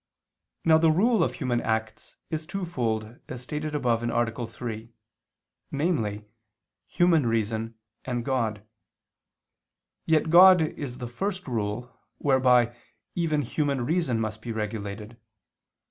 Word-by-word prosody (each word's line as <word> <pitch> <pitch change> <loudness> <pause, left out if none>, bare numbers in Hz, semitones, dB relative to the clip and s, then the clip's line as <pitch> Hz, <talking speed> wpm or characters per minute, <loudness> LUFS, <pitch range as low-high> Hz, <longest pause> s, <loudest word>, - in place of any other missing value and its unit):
Now 160 -1 +6
the 165 0 +4
rule 200 +4 +3
of - - -1
human 120 -3 -1
acts 110 -1 -3
is 155 0 -3
twofold, 120 - -3
as 125 -1 -7
stated 150 +3 -4
above 120 -5 +1
(A. 120 0 -1
3), 115 -1 -7 0.8
namely, 115 - -1 0.6
human 165 -7 +3
reason 115 0 -1 0.3
and 120 -2 -3
God: 110 -6 -1 1.4
yet 160 -1 +2
God 180 0 +8
is 140 -5 -5
the 125 -2 -5
first 190 - -4
rule, 115 0 -3 0.2
whereby, 125 -3 +3 0.4
even 155 -4 0
human 140 -1 -1
reason 155 -7 +1
must 110 -1 -3
be 115 - -5
regulated. 105 +1 -5
125 Hz, 115 wpm, -26 LUFS, 115-155 Hz, 1.4 s, God